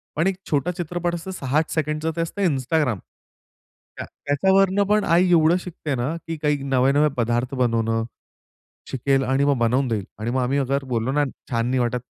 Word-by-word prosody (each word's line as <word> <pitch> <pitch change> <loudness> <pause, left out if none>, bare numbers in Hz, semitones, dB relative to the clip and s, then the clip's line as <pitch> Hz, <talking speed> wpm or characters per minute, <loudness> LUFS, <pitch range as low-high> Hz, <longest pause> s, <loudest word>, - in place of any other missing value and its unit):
पण 160 +4 +1
एक 195 - +1
छोटा 145 +3 +1
चित्रपट 175 0 -2
असतं 175 +3 -6
6-8 150 -2 -1
सेकंडचं 155 +1 -1
ते 165 - -1
असतं 165 +4 -4
Instagram. 135 - 0 1.0
या - - -4
त्याच्यावरून 190 +7 +2
पण 210 0 +3
आई 180 +2 +3
एवढं 165 0 +5
शिकते 160 -5 -4
ना 125 +5 -1
की 165 -1 -3
काही 150 -1 +1
नवे-नवे 140 +3 +3
पदार्थ 120 +3 0
बनवणं. 115 -2 +1 0.9
शिकेल 135 +1 +1
आणि 135 +2 +1
मग 140 -2 +2
बनवून 125 +3 +2
देईल. 110 -4 -1
आणि 110 +2 -3
मग 130 +1 0
आम्ही 130 +3 0
अगर 140 0 0
बोललो 115 +3 0
ना 145 0 +2 0.3
छान 115 -1 0
नाही 130 +1 +1
वाटत, 120 0 0
140 Hz, 180 wpm, -23 LUFS, 125-165 Hz, 1.0 s, एवढं